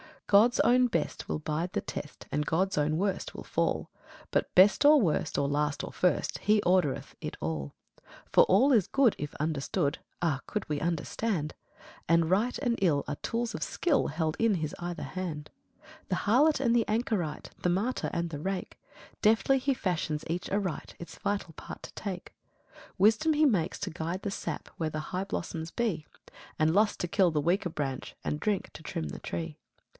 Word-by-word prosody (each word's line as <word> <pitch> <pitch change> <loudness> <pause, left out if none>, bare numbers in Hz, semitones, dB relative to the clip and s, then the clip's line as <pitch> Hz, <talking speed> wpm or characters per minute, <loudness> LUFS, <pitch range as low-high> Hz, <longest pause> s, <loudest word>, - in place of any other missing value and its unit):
God's 215 +4 +5
own 250 +2 +5
best 170 -9 -2
will - - -2
bide 155 +3 -2
the - - 0
test, 145 - -7
And 150 - 0
God's 185 +4 +1
own 150 +1 +2
worst 195 +1 -1
will - - -7
fall; - - -1 0.4
But, - - 0
best 190 +8 +6
or 300 0 +8
worst 165 - 0
or 140 - +2
last 145 0 0
or - - -5
first, 180 - 0
He 210 0 +3
ordereth 180 -7 +1
it - - -5
all. 75 -2 -3 0.2
2. - - -27 0.3
For - - +7
ALL 255 +10 +4
is 220 -8 +4
good, 270 -5 +4
if 150 - -5
understood, 150 +1 -1 0.2
(Ah, 160 -6 +1
could 210 - -3
we 150 -1 0
understand!) 165 +1 -1 0.5
And 170 0 +3
right 220 +6 +2
and 240 -4 0
ill 155 -7 +3
are 145 - -3
tools 230 -1 -2
of - - -5
skill 310 -6 +1
Held 155 +1 -1
in 225 -3 +3
His 155 -3 -3
either 175 0 -4
hand. 165 -5 -5 0.3
3. - - -19 0.2
The - - +1
harlot 275 +8 +3
and 235 -3 +3
the 235 -2 +3
anchorite, 210 - -1
The 180 - +1
martyr 205 +9 0
and 170 0 -1
the 150 -3 -5
rake, 190 +3 -4 0.4
Deftly 225 +5 +4
He 275 +1 +1
fashions 165 -8 -2
each 175 +2 -3
aright, 195 -5 -2
Its 170 - -10
vital 200 -4 -2
part - - -9
to - - -9
take. 190 -4 -6 0.4
4. - - -18
Wisdom 220 +11 +4
He 305 +1 +4
makes 190 - +1
to - - -2
guide 170 +3 -3
the 200 - -2
sap - - -5
Where 160 -2 -1
the 155 0 -5
high 185 +2 -1
blossoms 165 -4 -4
be; 195 -11 -1 0.5
And 155 0 +3
Lust 210 +2 +2
to 175 - -1
kill 185 -1 +3
the 150 -1 +1
weaker 175 +4 +1
branch, 135 -5 -4
And 150 - -2
Drink 205 +1 -1
to - - -10
trim 80 - -4
the - - -7
tree. 80 -3 -5
180 Hz, 190 wpm, -29 LUFS, 155-215 Hz, 0.5 s, or